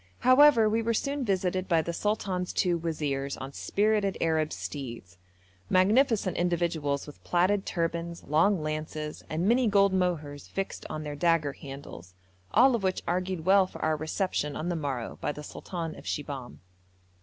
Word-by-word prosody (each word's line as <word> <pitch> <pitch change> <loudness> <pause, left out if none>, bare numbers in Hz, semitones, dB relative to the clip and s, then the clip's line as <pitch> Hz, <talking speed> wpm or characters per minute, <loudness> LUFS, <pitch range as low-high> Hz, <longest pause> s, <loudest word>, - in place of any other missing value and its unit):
However, 255 -3 +6
we 220 +2 +1
were 230 0 0
soon 280 +3 -1
visited 185 -3 0
by 165 -3 +3
the 170 - -3
sultan's 190 -2 -1
two 180 -3 +1
wazirs 150 -5 -2
on 135 +1 -7
spirited 205 +1 +1
Arab 160 -1 +1
steeds: 115 - -7 0.5
magnificent 210 +1 +3
individuals 170 -5 0
with 150 - -13
plaided 190 +3 +1
turbans, 170 0 -2
long 165 +4 +2
lances, 155 0 -4
and 165 +4 -1
many 240 +2 +4
gold 200 -2 +4
mohurs 155 -6 -1
fixed 195 0 -4
on 155 0 -4
their 150 -1 -5
dagger 160 -3 +2
handles, 135 -12 -10 0.4
all 255 +4 +6
of 230 - -2
which 190 -1 -1
argued 180 -1 -1
well 190 0 +5
for - - -11
our 155 0 +2
reception 155 -1 -2
on 170 - -3
the 175 - -1
morrow 140 -7 -4
by - - 0
the 150 0 -8
sultan 165 +1 -6
of - - -12
Shibahm. 140 -4 -5
170 Hz, 160 wpm, -28 LUFS, 150-195 Hz, 0.5 s, However